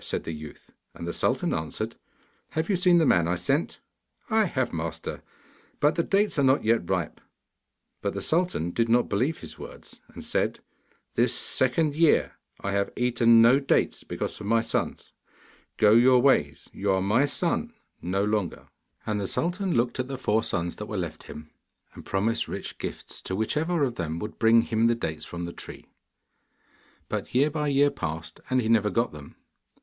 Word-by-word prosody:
said - - -3
the - - -5
youth. 75 -1 -11 0.2
And 85 - -7
the 85 - -3
sultan - - 0
answered, 80 -1 -4 0.6
'Have 160 +5 -1
you - - +3
seen 180 -1 +4
the 165 - +4
man 85 - +3
I 90 - +1
sent?' 135 - -1 0.5
'I 220 -1 +4
have, 130 -8 -1
master; 80 0 -4 0.6
but 150 +2 +3
the 170 - +1
dates 200 -1 +1
are - - +3
not 130 +1 +3
yet 110 -5 +1
ripe.' 90 -5 -2 0.8
But - - -2
the - - -3
sultan 165 - 0
did 115 +4 0
not 120 +1 +3
believe 130 +11 0
his - - -11
words, - - -10
and - - -10
said; - - -1 0.5
'This - - +2
second 145 +4 +1
year 165 -1 +3 0.3
I 100 - -2
have 100 0 0
eaten 115 -2 +5
no 125 +4 +6
dates, 135 - +1
because - - -4
of 100 - -6
my 115 +1 +3
sons. - - -3 0.6
Go 105 -1 +5
your 125 +3 +6
ways, 120 - +2
you 100 0 -1
are 95 - +2
my 115 +9 +3
son 180 +10 -1 0.3
no 95 +3 -1
longer!' 105 -4 -2 0.4
And 105 -1 -1
the 100 - -2
sultan 180 - -1
looked 120 +2 0
at 130 - -1
the 135 0 -5
four 110 -4 +1
sons 85 -5 -3
that 105 - -6
were 105 - -4
left 85 -4 -5
him, 75 0 -10 0.4
and - - -11
promised 110 +4 0
rich - - -6
gifts - - -6
to 95 - -4
whichever 150 - 0
of 130 -4 0
them 80 -2 -3
would 105 +5 -6
bring 115 0 +5
him 115 0 +1
the 120 - +3
dates 80 -9 -4
from 85 0 -6
the 85 - -7
tree. - - -10 1.2
But - - -4
year 145 +4 +4
by 150 0 -1
year 140 0 +3
passed, 85 - -5
and 130 -1 +2
he - - -2
never 110 -2 +3
got 115 +3 0
them. 75 -2 -12
115 Hz, 185 wpm, -26 LUFS, 95-140 Hz, 1.2 s, no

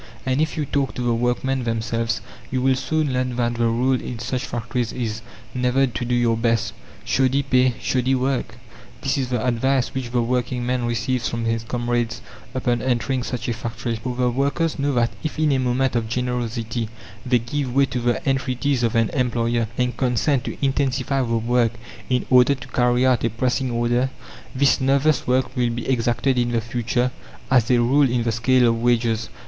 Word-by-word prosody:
And 130 +2 +1
if 160 - -1
you 150 - 0
talk 140 -1 -1
to 125 - -3
the 120 -1 +2
workmen 125 +2 0
themselves, 115 0 -1 0.3
you 130 - -1
will 130 +1 +3
soon 150 +2 -1
learn 125 -1 -1
that 120 -1 0
the 120 0 +1
rule 125 +3 +1
in 125 - -5
such 125 +2 -3
factories 120 0 -2
is 110 -3 -3 0.3
never 125 +2 +2
to 120 -3 -4
do 125 +1 0
your 120 -1 +2
best. 115 -1 0 0.3
"Shoddy 135 +1 +2
pay 130 -2 +3
shoddy 130 +1 +1
work!" 130 -3 -1 0.4
this 135 - 0
is 130 -3 -1
the 125 -2 -1
advice 125 +1 +1
which 130 -2 -3
the 120 -1 +1
working 125 0 -1
man 125 -1 0
receives 120 +1 -1
from 115 0 -3
his 115 0 0
comrades 120 -1 -1 0.4
upon 120 -2 0
entering 130 +1 0
such 125 -1 -4
a 120 - 0
factory. 115 +1 -4
For 125 +2 -4
the 125 -1 +1
workers 140 +6 0
know 140 +1 +1
that 120 -1 +2
if 155 - -4
in 155 -1 +2
a 135 - +2
moment 130 0 +1
of 115 -2 -1
generosity 120 -2 -2 0.3
they 125 -1 +3
give 125 +3 -3
way 140 0 +5
to 125 - -3
the 120 +3 -1
entreaties 135 0 0
of 115 0 0
an 115 -1 +3
employer 120 -3 0
and 125 0 0
consent 125 +1 +1
to - - -5
intensify 135 0 0
the 115 -2 0
work 120 0 +1 0.4
in 125 -1 +1
order 125 +2 +6
to 130 -1 -11
carry 125 0 +2
out 130 -3 +3
a 115 - +2
pressing 125 +3 -1
order, 120 +2 +1 0.5
this 140 +1 +3
nervous 135 +2 +2
work 130 +1 +1
will 125 -2 +1
be 120 +1 -4
exacted 125 +1 +1
in 120 0 0
the 115 - +2
future 120 +2 -1 0.4
as 125 -4 +4
a 125 - +5
rule 135 +3 +4
in 120 -1 0
the 115 - 0
scale 125 +2 +3
of 115 0 +1
wages. 115 -2 +1
125 Hz, 195 wpm, -22 LUFS, 120-130 Hz, 0.5 s, order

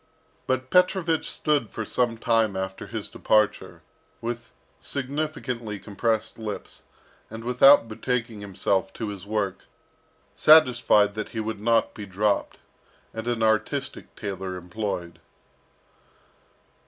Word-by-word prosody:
But 130 0 -1
Petrovich 180 -3 +2
stood 145 -7 0
for 110 - -5
some 120 +1 0
time 115 -3 +2
after 95 0 -4
his - - -5
departure, 105 -1 0 0.4
with 120 0 -5 0.3
significantly 130 - -3
compressed 110 +3 -2
lips, 110 -2 -6 0.5
and 110 +1 -8
without 125 +1 +6
betaking 115 -1 -3
himself 95 -1 -1
to 110 - -4
his 100 -1 -8
work, 105 -3 -2 0.7
satisfied 125 -9 +5
that 110 0 -5
he - - 0
would 110 -1 -3
not 115 +2 +2
be 105 -2 -8
dropped, 100 +2 0 0.6
and 110 +1 -6
an 120 -2 0
artistic 110 -1 -1
tailor 95 -2 -5
employed. 90 -1 -5
110 Hz, 115 wpm, -25 LUFS, 100-125 Hz, 0.7 s, without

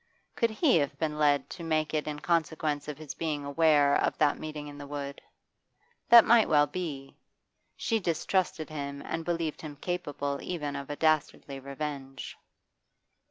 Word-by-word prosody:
Could 230 - +2
he 245 - +3
have 145 -3 -1
been 150 -2 -2
led 145 -2 +3
to 175 - -7
make 155 -1 0
it 155 -1 -1
in 150 -1 -4
consequence 160 -3 0
of 150 - -5
his 155 -2 -7
being 150 -3 -3
aware 145 -1 +4
of - - +1
that 150 -2 +2
meeting 150 -1 -6
in 145 0 -10
the 145 - -8
wood? 140 -1 -6 0.9
That 235 -1 +10
might 230 -1 +5
well 145 -1 +5
be; 145 -5 -6 0.6
she 225 -1 0
distrusted 170 -2 0
him 140 -2 -5
and 165 0 -3
believed 165 -2 -2
him 150 -2 -7
capable 145 -4 -3
even 150 -5 -4
of 140 0 -6
a 145 - -3
dastardly 150 -3 0
revenge. 140 0 -6
150 Hz, 160 wpm, -29 LUFS, 145-165 Hz, 0.9 s, That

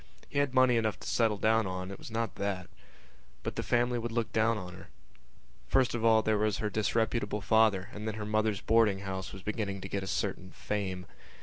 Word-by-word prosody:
He 140 - 0
had 140 -2 0
money 130 -2 +5
enough 110 -2 0
to - - -7
settle 110 -3 +2
down 110 0 +2
on; 95 0 -4
it 100 - -8
was - - -9
not 115 -1 -2
that. 95 -3 -3 0.7
But - - -4
the - - -1
family 120 0 +1
would 120 0 -3
look 115 -1 -2
down 110 0 +3
on 90 -3 -7
her. 95 +1 -12 0.8
First 130 - +3
of 120 -1 -2
all 110 -1 +5
there 110 -1 +2
was 105 -1 +1
her 105 -1 -2
disreputable 110 +1 0
father 105 -2 +3
and 105 +1 -6
then 110 - -2
her 105 -1 -4
mother's 110 -1 0
boarding 110 -4 +3
house 95 -1 -4
was 95 -1 -10
beginning 105 -2 -2
to 95 - -5
get 100 0 -2
a 95 - -5
certain 95 0 -3
fame. 95 -3 -3
110 Hz, 215 wpm, -31 LUFS, 95-115 Hz, 0.8 s, money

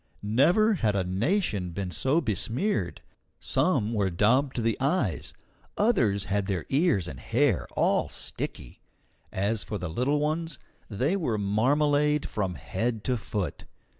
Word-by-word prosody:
Never 160 - +4
had 110 - +1
a 95 - +1
nation 100 - 0
been 95 -1 -4
so 140 - +1
besmeared. 110 - -1 0.4
Some 105 +3 +1
were 100 -3 +1
daubed 125 +10 +2
to 120 - -1
the 115 -1 +1
eyes, 135 - 0 0.5
others 120 - +2
had 100 0 -1
their 95 -4 -2
ears 140 - +2
and - - -7
hair 120 -4 +1
all - - +2
sticky. - - -6 0.5
As 100 +3 0
for 105 - -4
the 90 -2 -4
little 130 - +1
ones, 155 0 -2 0.3
they 130 - 0
were 140 - -1
marmalade 145 +8 +2
from 95 -4 -2
head 110 +4 -3
to 130 - 0
foot. 100 - -4
115 Hz, 140 wpm, -27 LUFS, 100-145 Hz, 0.5 s, Never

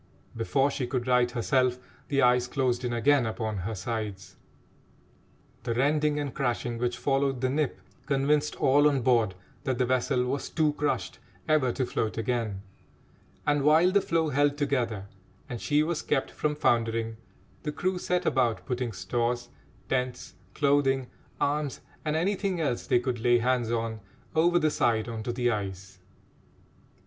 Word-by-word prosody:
Before 135 +5 +1
she 130 -2 -2
could 120 -1 -2
right 125 -1 +3
herself, 125 +1 +1 0.3
the 140 -2 +2
ice 125 0 +4
closed 125 -2 0
in 125 - -1
again 125 +2 +3
upon 110 -1 -3
her 100 +4 -3
sides. 105 -1 -5 1.3
The 115 - -2
rending 150 +3 +2
and 145 -2 -3
crashing 120 -2 -2
which 120 0 -1
followed 135 -1 +1
the 130 +1 0
"nip" 150 0 -1 0.3
convinced 145 +2 +1
all 145 +3 +4
on 135 -4 0
board 115 -6 +3 0.3
that 130 -4 -1
the 125 - +2
vessel 125 0 +1
was 135 +2 -2
too 155 -2 +1
crushed 150 0 -2 0.3
ever 150 -5 +3
to 130 - -1
float 110 -2 -2
again, 115 -4 -2 0.8
and, 145 -1 +2
while 160 +5 +5
the 200 +1 +4
floe 165 -3 0
held 145 +1 +2
together 125 -8 -1 0.4
and 120 -2 -6
she 150 0 +2
was 165 0 -1
kept 135 -3 -1
from 150 -1 -1
foundering, 115 -4 +1 0.4
the 150 - -3
crew 185 +4 -1
set 180 0 -1
about 120 -5 +1
putting 125 -3 -2
stores, 120 +5 -2 0.4
tents, 125 -5 -2 0.2
clothing, 140 -3 +2 0.3
arms, 145 -1 0 0.2
and 155 -1 -1
anything 190 +2 0
else 140 -7 -1
they - - +4
could 125 -1 -2
lay 120 +1 +4
hands 120 -1 +1
on, 115 -1 -2 0.4
over 170 +2 +4
the 155 -3 +2
side 115 -4 +1
on 115 -2 -4
to 120 - -3
the 120 0 +1
ice. 95 -2 -5
125 Hz, 155 wpm, -28 LUFS, 120-145 Hz, 1.3 s, while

